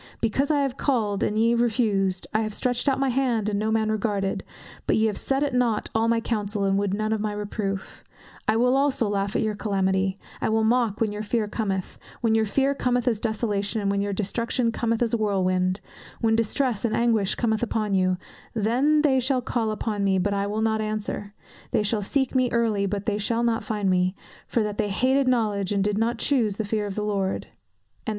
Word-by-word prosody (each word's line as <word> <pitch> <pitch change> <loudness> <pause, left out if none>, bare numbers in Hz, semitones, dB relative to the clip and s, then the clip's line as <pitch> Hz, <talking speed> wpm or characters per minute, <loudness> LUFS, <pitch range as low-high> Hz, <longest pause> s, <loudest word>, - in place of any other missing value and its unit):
"Because 265 +6 0
I 295 -2 +3
have 275 -1 -1
called, 215 -8 0
and 210 - 0
ye 230 +2 +4
refused; 215 -6 +1
I 215 - +2
have 215 -1 -3
stretched 250 +2 0
out 270 - 0
my 270 -1 +2
hand, 240 -5 +1
and 200 -1 -1
no 215 +1 0
man 220 -1 +1
regarded; 205 -2 -1 0.4
but - - +3
ye 220 - +3
have 215 -2 0
set 270 +1 0
at 285 -2 -1
nought 240 -4 +1
all 225 +1 +2
my 230 0 +3
counsel, 210 -3 -2
and 195 0 +2
would 200 -1 0
none 215 +2 0
of 220 - -1
my 210 -1 -1
reproof; 205 -1 -4 0.4
I 215 - +3
also 260 +2 +3
will 205 - -1
laugh 200 0 -1
at - - +2
your 215 -1 0
calamity; 190 -2 0 0.2
I - - +1
will 220 0 +2
mock 230 -2 +2
when 220 -2 +2
your 210 0 -4
fear 215 0 -1
cometh: 195 -4 -3 0.2
when 230 -2 +2
your 220 -1 +2
fear 275 +6 +2
cometh 250 -2 0
as 225 -4 +2
desolation, 220 -1 -1
and 200 -1 0
your 200 0 -1
destruction 230 +4 -1
cometh 230 0 0
as 230 - -1
a - - +3
whirlwind; 185 -3 +1 0.4
when 225 -1 +2
distress 230 +1 0
and 230 -2 +1
anguish 225 -5 +2
cometh 220 -3 0
upon 215 -3 -1
you: 185 -1 +2 0.4
then 260 +8 +2 0.2
shall 255 0 +1
they - - -22
call 230 -4 0
upon 215 -1 -2
me, 195 -1 +2
but 200 +2 0
I 200 0 0
will 215 +2 -1
not 220 -1 +1
answer; 210 -1 -4 0.3
they - - +1
shall 210 +1 0
seek 265 +6 0
me 255 -2 +2
early, 220 -4 +1
but 200 0 -3
they 210 -2 0
shall 230 +3 0
not 230 -1 +1
find 210 -3 -2
me: 185 0 +2 0.3
for 230 - +1
that 210 -1 -4
they 205 - +1
hated 260 +6 +2
knowledge, 210 -6 +1
and 200 -1 +1
did 205 +1 0
not 230 +1 +1
chuse 230 -7 +1
the 220 - -3
fear 210 0 -1
of 195 - -5
the 210 - -2
Lord." 195 -2 -1
215 Hz, 215 wpm, -25 LUFS, 200-235 Hz, 0.4 s, ye